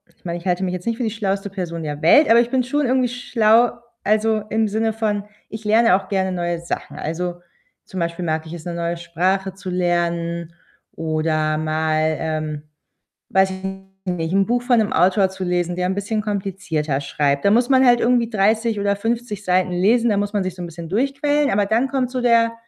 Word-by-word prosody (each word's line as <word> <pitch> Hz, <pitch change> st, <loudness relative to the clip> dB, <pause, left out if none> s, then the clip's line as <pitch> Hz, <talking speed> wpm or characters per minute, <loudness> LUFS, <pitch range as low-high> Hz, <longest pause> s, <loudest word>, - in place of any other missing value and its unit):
ich -, -, -38 dB
meine, 170 Hz, 0 st, -3 dB
ich 175 Hz, -, -9 dB
halte 180 Hz, +1 st, +1 dB
mich 180 Hz, -1 st, -1 dB
jetzt 180 Hz, +2 st, -6 dB
nicht 230 Hz, -1 st, 0 dB
für 245 Hz, -, -2 dB
die 220 Hz, -, -1 dB
schlauste 200 Hz, -2 st, -2 dB
Person 170 Hz, -4 st, -5 dB
der 150 Hz, -1 st, -5 dB
Welt, 290 Hz, -, +6 dB
aber 230 Hz, +1 st, +7 dB
ich 235 Hz, 0 st, +2 dB
bin 260 Hz, 0 st, +1 dB
schon 290 Hz, +4 st, 0 dB
irgendwie 255 Hz, 0 st, +2 dB
schlau, 235 Hz, -1 st, +3 dB, 0.3 s
also, 215 Hz, +1 st, +2 dB
im 220 Hz, 0 st, +1 dB
Sinne 220 Hz, +2 st, 0 dB
von 210 Hz, -2 st, -1 dB, 0.2 s
ich 220 Hz, 0 st, -8 dB
lerne 220 Hz, -1 st, +4 dB
auch 195 Hz, 0 st, -3 dB
gerne 190 Hz, -1 st, 0 dB
neue 175 Hz, -1 st, -2 dB
Sachen. 170 Hz, -, -5 dB
Also, 175 Hz, +3 st, -3 dB, 0.5 s
zum 190 Hz, -, -7 dB
Beispiel 170 Hz, +1 st, -2 dB
mag 160 Hz, -1 st, -1 dB
ich 160 Hz, -, -8 dB
es, 170 Hz, -2 st, -9 dB
'ne 175 Hz, -, -4 dB
neue 170 Hz, 0 st, -2 dB
Sprache 180 Hz, +3 st, -1 dB
zu 190 Hz, 0 st, -8 dB
lernen 170 Hz, -1 st, -1 dB, 0.4 s
oder 155 Hz, -1 st, 0 dB
mal, 155 Hz, 0 st, 0 dB
ähm, 155 Hz, -2 st, -3 dB, 0.7 s
weiß 190 Hz, 0 st, +3 dB
ich 190 Hz, 0 st, -8 dB, 0.5 s
nicht, 165 Hz, -1 st, -3 dB
'n 195 Hz, 0 st, +3 dB
Buch 240 Hz, +1 st, +1 dB
von 245 Hz, -2 st, +3 dB
'nem 215 Hz, -1 st, 0 dB
Autor 190 Hz, +2 st, +3 dB
zu 190 Hz, 0 st, -6 dB
lesen, 175 Hz, -1 st, -1 dB
der 180 Hz, 0 st, -1 dB
ein 190 Hz, -, -1 dB
bisschen 210 Hz, +2 st, -2 dB
komplizierter 190 Hz, -8 st, -2 dB
schreibt. 140 Hz, 0 st, 0 dB
Da 200 Hz, -, +5 dB
muss 240 Hz, +3 st, +3 dB
man 265 Hz, -1 st, +5 dB
halt 240 Hz, -1 st, +5 dB
irgendwie 240 Hz, -1 st, +2 dB
30 220 Hz, +1 st, +1 dB
oder 200 Hz, 0 st, +1 dB
50 225 Hz, -1 st, -3 dB
Seiten 185 Hz, 0 st, +2 dB
lesen, 225 Hz, +7 st, +3 dB
da 205 Hz, -, +1 dB
muss 205 Hz, +1 st, -1 dB
man 205 Hz, -2 st, +1 dB
sich 185 Hz, -1 st, -4 dB
so 180 Hz, -, -8 dB
'n -, -, -4 dB
bisschen 170 Hz, -1 st, -8 dB
durchquälen. 275 Hz, -, +1 dB
Aber 205 Hz, +1 st, +2 dB
dann 230 Hz, +5 st, +2 dB
kommt 265 Hz, -2 st, 0 dB
so 255 Hz, -1 st, -2 dB
der 230 Hz, -1 st, +3 dB
190 Hz, 215 wpm, -21 LUFS, 170-225 Hz, 0.7 s, aber